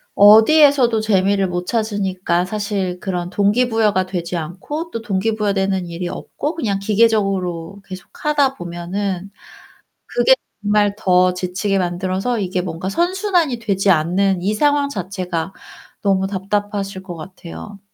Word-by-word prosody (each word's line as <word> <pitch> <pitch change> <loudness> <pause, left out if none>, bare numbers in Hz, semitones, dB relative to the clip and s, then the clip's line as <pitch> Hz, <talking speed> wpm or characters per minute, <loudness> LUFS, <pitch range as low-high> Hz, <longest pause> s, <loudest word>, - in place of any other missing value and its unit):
어디에서도 240 +3 +6
재미를 195 -2 +2
못 180 0 -3
찾으니까 190 -5 -1
사실 195 -3 -3
그런 180 -3 -3
동기부여가 210 -1 +2
되지 175 -1 -4
않고 195 - -5
또 230 - -4
동기 215 +1 -1
부여되는 195 -3 0
일이 170 +1 -5
없고 300 - -5
그냥 205 -11 -1
기계적으로 195 -4 0
계속하다 270 +9 -1
보면은 180 +2 -4 0.7
그게 245 +2 +4 0.3
정말 205 -1 +2
더 185 -3 +3
지치게 185 +2 -1
만들어서 185 +6 -1
이게 185 -2 -1
뭔가 175 0 -5
선순환이 350 - +1
되지 200 -3 0
않는 185 +3 +2
이 200 +4 0
상황 285 +4 +2
자체가 185 -5 -4 0.5
너무 195 -1 +1
답답하실 200 0 -3
것 180 -2 -7
같아요. 185 +4 -10
195 Hz, 305 characters per minute, -19 LUFS, 180-220 Hz, 0.7 s, 어디에서도